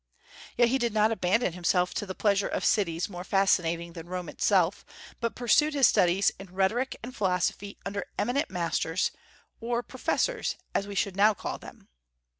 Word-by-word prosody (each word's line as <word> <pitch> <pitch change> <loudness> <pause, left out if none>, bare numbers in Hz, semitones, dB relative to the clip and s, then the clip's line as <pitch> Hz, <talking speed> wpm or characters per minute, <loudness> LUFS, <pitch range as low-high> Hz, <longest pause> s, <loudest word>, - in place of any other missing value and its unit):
Yet 240 -1 +5
he 265 +2 +1
did 235 -3 -1
not 215 +1 +4
abandon 205 -1 +1
himself 180 0 +1
to 205 - -3
the 185 - -5
pleasures 200 -1 +1
of - - -1
cities 175 -5 +1
more 180 -3 -7
fascinating 170 -4 +1
than 165 -1 -9
Rome 180 -3 -4
itself, 190 -2 +1 0.4
but 230 -1 -2
pursued 290 +6 +3
his 275 -2 +5
studies 180 0 +4
in 195 - -9
rhetoric 195 +8 0
and 250 +2 -7
philosophy 195 0 -1
under 200 0 -4
eminent 250 +6 0
masters, 170 0 -1 0.5
or 235 +1 -2
"professors" - - -1 0.2
as 200 - 0
we 200 - -7
should 195 0 0
now 210 +2 +4
call - - -5
them. - - -13
200 Hz, 170 wpm, -28 LUFS, 180-230 Hz, 0.5 s, Yet